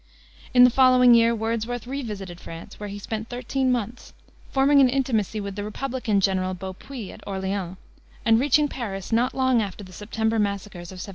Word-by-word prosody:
In 250 -1 +7
the 250 - +7
following 255 -1 +6
year 230 0 +5
Wordsworth 230 +2 -3
revisited 210 -9 -6
France, 165 -1 -10
where 210 -1 -5
he 200 - -6
spent 220 +2 -5
thirteen 255 +2 -1
months, 240 -1 -3 0.4
forming 280 +1 +4
an 260 - +5
intimacy 235 -6 0
with 200 -1 -5
the 205 - -4
republican 235 -1 -1
general, 185 -1 0
Beaupuis, 190 +5 -8
at - - -13
Orleans, 190 -2 -3 0.5
and 225 0 +5
reaching 295 +3 +3
Paris 200 -9 -6
not 235 +3 +1
long 260 -3 +3
after 205 0 -5
the 185 -1 -13
September 220 +2 -1
massacres 200 -4 -3
of - - -9
1792. 185 +2 -7
225 Hz, 180 wpm, -24 LUFS, 195-250 Hz, 0.5 s, In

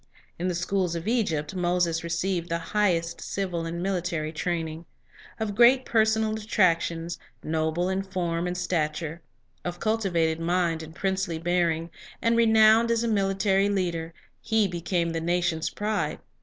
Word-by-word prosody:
In 180 - -1
the 180 - -1
schools 175 0 0
of 170 +3 -5
Egypt, 195 -10 0
Moses 175 -2 +1
received 170 +1 -1
the 170 - 0 0.2
highest 175 -6 +1
civil 180 -4 -3
and 170 +1 -4
military 175 -5 -1
training. 165 0 -3 0.5
Of 220 -2 -2
great 245 +4 +5
personal 220 -1 +2
attractions, 175 -6 0 0.2
noble 160 +2 0
in 190 +1 0
form 180 -3 -2
and 180 0 -3
stature, 160 -2 -2 0.4
of 175 0 -4
cultivated 175 -8 +1
mind 170 -1 0
and 160 0 -10
princely 190 -3 -1
bearing, 170 -1 0 0.3
and 230 0 +2
renowned 225 0 +5
as 230 0 +2
a - - 0
military 195 -1 +2
leader, 170 -4 -1 0.3
he 220 -2 +2
became 170 -1 -1
the 165 0 -2
nation's 175 -1 0
pride. 210 0 -2
175 Hz, 140 wpm, -26 LUFS, 165-200 Hz, 0.5 s, great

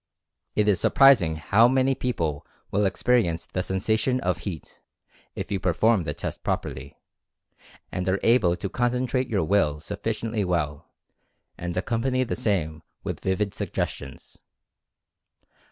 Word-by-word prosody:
It 105 -1 +2
is 100 -4 +3
surprising 125 - +5
how 100 +9 +4
many 130 +1 +3
people 85 - -2 0.3
will 100 0 +2
experi 120 +3 +2
ence 85 -1 -3
the 90 - -3
sensation 110 +7 0
of 90 -3 0
heat, 85 -3 -7 0.5
if - - -5
you 100 - 0
perform 95 +2 +2
the 75 - -2
test - - -5
properly, - - -4 0.9
and 90 +1 -2
are 95 +1 +1
able 110 -7 +4
to 100 - -4
concentrate 125 +4 0
your 100 -6 +1
Will 80 -5 +2
suf 100 +6 -7
ficiently 110 -1 -1
well, 80 -6 -2 0.7
and 90 0 -5
accompany 125 +6 0
the 120 - -3
same 85 -10 -1 0.2
with - - -4
vivid 95 +1 -1
suggestions. 70 - -5
100 Hz, 135 wpm, -25 LUFS, 85-120 Hz, 0.9 s, surprising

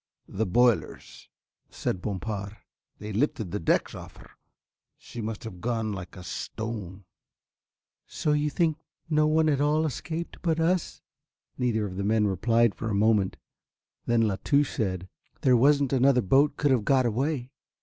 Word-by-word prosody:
"The 110 +2 -2
boilers," 120 -1 0 0.4
said 90 - -3
Bompard, 100 +1 -4 0.4
"they 105 0 -7
lifted 110 - -1
the 105 - -2
decks 80 - +1
off - - -10
her. - - -15 0.7
She 120 - -9
must 110 -1 -5
have 95 -6 -9
gone 115 -2 -1
like 95 -2 -8
a 90 - -9
stone." 100 -3 -6 1.0
"So 150 - -1
you 150 0 +1
think 160 0 0 0.3
no 150 0 +3
one 155 +1 +3
at 145 -2 +2
all 150 +2 +2
escaped 160 +4 -4
but 165 -2 0
us?" 175 +2 0 0.6
Neither 115 -4 +1
of 95 -2 -6
the 100 - -2
men 105 +1 +2
replied 115 +3 +2
for 110 +4 -5
a 105 - -1
moment, 105 -2 +2 0.7
then 120 -1 +3
La 100 -3 0
Touche 145 -1 +2
said: 95 -4 -2 0.3
"There 130 -2 +4
wasn't 140 +2 +3
another 130 -1 +4
boat 140 +8 +3
could 145 - +2
have 125 -5 +2
got 130 +2 +3
away." 130 +2 -1
115 Hz, 160 wpm, -27 LUFS, 105-145 Hz, 1.0 s, There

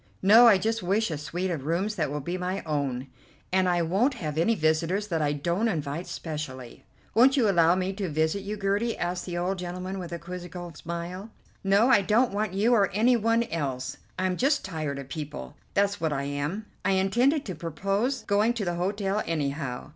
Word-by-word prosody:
"No, 225 +5 +8
I 210 -4 +7
just 225 +4 -1
wish 200 +2 +1
a 155 - -2
suite 175 +5 -3
of 150 -4 -4
rooms 185 +6 0
that 165 -8 -1
will 145 +1 -3
be 175 +6 -3
my 185 +1 -3
own; 140 -5 -2 0.5
and 185 -1 +3
I 175 -1 +2
won't 210 - +1
have 155 - -4
any 170 +9 +2
visitors 165 +4 +1
that 165 -3 0
I 145 -1 +1
don't 170 +9 0
invite 160 -3 -3
specially." 140 -6 -6 0.3
"Won't 260 +5 +5
you 235 -5 +4
allow 170 -3 +4
me 185 +1 -1
to 195 -2 -3
visit 160 +5 0
you, 205 +2 -5
Gertie?" 205 +4 0
asked 175 +1 -3
the 175 -1 -3
old 185 +2 -1
gentleman 180 +2 -5
with 175 -2 -7
a 170 - -3
quizzical 175 0 -7
smile. 170 +6 -6 0.3
"No, 200 +5 +4
I 210 -6 +6
don't 220 +4 +2
want 205 -2 -1
you 220 +5 +3
or 200 -5 +4
any 230 +6 +3
one 230 +1 +2
else. 135 - -3 0.2
I'm 185 -1 0
just 280 +3 +2
tired 155 -6 -3
of 140 -1 -7
people, 140 - -6 0.2
that's 200 -2 +1
what 160 -2 +1
I 140 -1 -1
am. 145 +9 -3 0.2
I - - +2
intended 240 +10 +2
to 185 - -4
propose 195 - -2
going 210 +3 +2
to 225 -4 -3
the 175 - -1
hotel 200 +2 0
anyhow. 140 -5 -3
180 Hz, 200 wpm, -27 LUFS, 160-205 Hz, 0.5 s, No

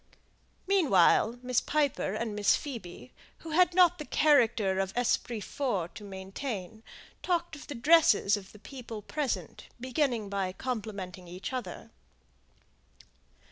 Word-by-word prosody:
Meanwhile 245 - +4
Miss 250 -1 +1
Piper 285 -9 0
and 220 -1 -3
Miss 205 -1 +3
Phoebe, 180 - -8 0.2
who 325 - -9
had 355 +2 +3
not 355 -2 +5
the 300 - -5
character 230 -12 +3
of 195 0 -1
esprit 240 -2 0
forts 205 - -2
to - - -12
maintain, 195 +2 -6 0.4
talked 345 -2 -1
of 290 - -12
the 290 - -6
dresses 250 -7 +4
of 195 -2 -9
the - - -14
people 230 -2 -9
present, 290 +3 -4
beginning 250 -3 -1
by 195 -2 -2
complimenting 200 -6 -5
each 180 +8 -7
other. 255 -2 -6
235 Hz, 130 wpm, -29 LUFS, 195-290 Hz, 0.4 s, not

